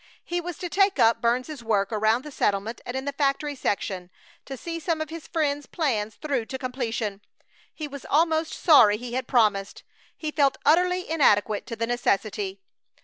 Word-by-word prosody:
He 350 0 -2
was 350 -1 -6
to 360 - -4
take 390 +3 +2
up 230 0 +4
Burns's 250 +3 -1
work 210 -3 +1
around 220 +3 +2
the 300 - -9
settlement 210 -1 -1
and 245 - -3
in 265 - -4
the 280 - -2
factory 285 +1 0
section; 190 -7 -2 0.4
to 270 - -7
see 335 +5 -5
some 330 -1 -1
of 315 0 -4
his 330 -1 -8
friend's 290 -3 -1
plans 220 -10 -1
through 275 -7 -2
to 265 - -4
completion. 230 -6 -3 0.5
He 305 - -6
was 280 -1 -9
almost 320 +1 +2
sorry 225 - +6
he 240 +1 -7
had 255 0 -2
promised. 210 -5 +1 0.3
He 310 -1 -4
felt 280 -3 +2
utterly 360 +4 +3
inadequate 215 -10 +2
to 230 - -5
the 230 +1 -1
necessity! 245 - -1
265 Hz, 180 wpm, -25 LUFS, 225-315 Hz, 0.5 s, sorry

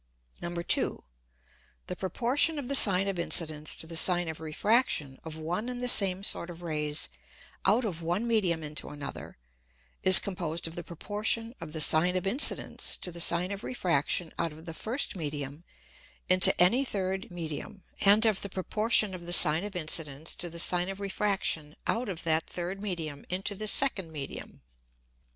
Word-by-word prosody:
2. - - +1 0.8
The - - -6
Proportion 250 - -1
of 280 -4 -6
the - - -1
Sine 195 -7 +7
of 195 -3 -4
Incidence 155 -3 0
to - - -8
the 165 +1 -9
Sine 175 0 +4
of 160 - -8
Refraction 160 - -1
of 160 -1 -9
one 175 +9 -5
and 250 -1 -5
the - - +1
same 195 -5 +6
sort 175 -3 -1
of 175 0 -11
Rays 150 -2 -3 0.6
out 220 +5 +2
of 175 -6 -5
one 175 +7 -3
Medium 190 -9 -1
into 150 0 -5
another, 145 -1 -9 0.6
is 185 - +6
composed 170 -4 -3
of 165 - -10
the 175 - -8
Proportion 210 +7 -4
of 165 -2 -9
the 160 0 -4
Sine 165 +4 +5
of 185 - -3
Incidence 235 +9 +1
to 180 - -6
the 170 0 -5
Sine 175 +3 +2
of 200 +2 -7
Refraction 170 - -2
out 170 -1 -2
of 160 +2 -14
the 165 - -8
first 230 - -2
Medium 145 -2 -7 0.6
into 185 0 +7
any 190 +10 +4
third 190 -6 -4
Medium, 175 +2 -8 0.2
and 205 +3 +4
of 215 -3 0
the 200 - -6
Proportion 215 +2 +1
of 175 -2 -10
the - - -6
Sine 155 +3 -1
of 205 -2 -8
Incidence 155 -2 +1
to 175 - -3
the 170 - -10
Sine 180 +2 +4
of 195 0 -7
Refraction 195 -6 -3
out 230 0 -2
of 175 -3 -6
that 160 -1 -1
third 180 +3 -6
Medium 165 -8 -6
into 190 +3 -3
the 215 +2 -5
second 205 -8 +3
Medium. 145 -3 -9
180 Hz, 175 wpm, -27 LUFS, 160-205 Hz, 0.8 s, Sine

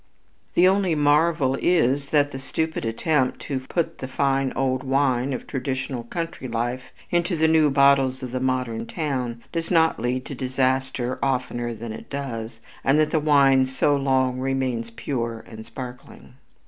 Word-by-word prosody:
The 180 - +6
only 190 -3 +2
marvel 150 -2 +3
is 140 -5 +2
that 145 -1 +2
the 135 - -6
stupid 160 +2 -3
attempt 130 +4 0
to 135 -2 -3
put 165 +5 -3
the 130 - -5
fine 135 0 +1
old 130 -1 0
wine 135 -1 +1
of 130 - -4
traditional 130 -2 -3
country 165 0 -5
life 120 +2 -2 0.3
into 175 +1 +1
the 160 0 +3
new 160 -2 +4
bottles 135 -1 +3
of 125 - -5
the 130 - -2
modern 125 -3 -1
town 130 -7 -3
does 165 -1 -3
not 165 -2 +3
lead 125 +2 -1
to - - -6
disaster 130 -1 -1
oftener 125 -3 -1
than 110 0 -6
it - - -10
does, 115 -5 -5 0.2
and 135 +2 +3
that 155 0 +2
the 160 - +2
wine 140 -3 +4
so 130 +2 +1
long 130 -2 +1
remains 130 -3 -1
pure 115 -1 -4
and 110 -1 -10
sparkling. 125 +1 -10
130 Hz, 160 wpm, -24 LUFS, 125-145 Hz, 0.3 s, The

